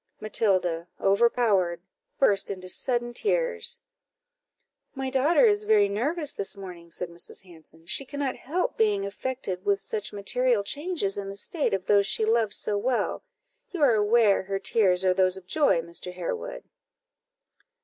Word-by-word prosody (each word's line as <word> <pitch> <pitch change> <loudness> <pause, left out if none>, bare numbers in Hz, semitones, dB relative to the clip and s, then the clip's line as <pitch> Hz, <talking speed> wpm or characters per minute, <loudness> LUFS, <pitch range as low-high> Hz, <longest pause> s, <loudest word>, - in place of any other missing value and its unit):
Matilda, 185 -6 0
overpowered, 200 -4 +2 0.4
burst 200 -7 +2
into 185 -2 -6
sudden 240 +4 -1
tears. 475 - -1 1.2
"My 265 -1 -3
daughter 275 +1 +4
is 210 -1 +2
very 210 -1 +4
nervous 285 - -1
this 200 +1 -4
morning," 180 -3 -10
said 175 +2 -5
Mrs. 170 +2 -8
Hanson; 165 -2 -15
"she 275 - 0
cannot 275 -1 -3
help 345 +7 -2
being 205 -3 +2
affected 200 -3 -4
with 200 -1 +2
such 210 0 -3
material 230 +2 +1
changes 290 - -2
in 195 -1 -5
the 195 - -7
state 285 - -1
of 190 -1 -5
those 200 0 +4
she 220 - +2
loves 220 -2 +2
so 205 -1 0
well; 245 +3 -1 0.5
you 350 -5 -2
are 260 -5 +6
aware 215 -1 +4
her 195 +1 -3
tears 190 -2 +2
are 185 - +4
those 185 0 +2
of 190 - -12
joy, 190 - +2
Mr. 170 +2 -7
Harewood." 445 - -5
205 Hz, 150 wpm, -26 LUFS, 190-255 Hz, 1.2 s, are